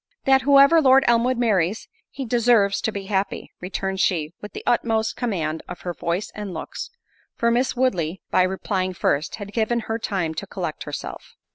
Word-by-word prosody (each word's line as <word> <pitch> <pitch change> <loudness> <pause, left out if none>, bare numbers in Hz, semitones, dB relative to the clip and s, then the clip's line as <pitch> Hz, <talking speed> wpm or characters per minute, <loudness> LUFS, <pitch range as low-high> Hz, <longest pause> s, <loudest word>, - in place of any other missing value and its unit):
"That 265 0 +5
whoever 280 +4 +6
Lord 265 -1 +6
Elmwood 240 +2 +3
marries, 210 -4 +1 0.2
he 270 - -6
deserves 230 -4 +3
to 220 - 0
be 200 -2 -6
happy:" 195 -1 -2
returned 190 +1 -3
she, 160 -4 +1
with 210 - -9
the - - -7
utmost 225 -2 +1
command 165 -10 -2
of 180 - -7
her 175 - -4
voice 170 +4 -3
and 205 -4 -6
looks; 160 - -6 0.5
for 235 0 +1
Miss 250 +3 +1
Woodley, 190 -9 0
by - - +4
replying 185 0 -1
first, 150 -1 0
had 205 -1 -8
given 235 +1 +1
her 225 +1 -3
time 185 -7 -2
to - - -6
collect - - -5
herself. - - -7
210 Hz, 175 wpm, -23 LUFS, 185-240 Hz, 0.5 s, whoever